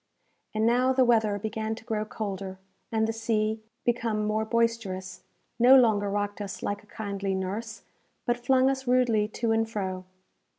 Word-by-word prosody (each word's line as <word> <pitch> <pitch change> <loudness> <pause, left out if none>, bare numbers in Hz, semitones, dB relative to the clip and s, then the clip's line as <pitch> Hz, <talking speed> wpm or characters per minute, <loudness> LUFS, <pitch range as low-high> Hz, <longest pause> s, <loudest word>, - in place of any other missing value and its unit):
And 215 +1 +2
now 250 +3 +3
the 260 -1 +4
weather 220 -4 +3
began 220 +1 -3
to 225 - -12
grow 215 -1 -2
colder, 195 -3 -5 0.3
and 220 -1 +1
the 225 - -1
sea, 220 -1 0 0.2
become 230 -3 0
more 215 +1 0
boisterous, 220 -6 -1 0.4
no 250 +3 +8
longer 215 -5 +4
rocked 205 +1 -2
us 200 -2 -6
like 205 0 -2
a 210 - -23
kindly 200 -2 -3
nurse, 210 +4 -4 0.4
but 240 -1 -1
flung 260 +1 +4
us 265 -1 -1
rudely 245 -4 +3
to 225 +1 -2
and 225 0 +1
fro. 190 -4 -4
220 Hz, 165 wpm, -27 LUFS, 205-230 Hz, 0.4 s, no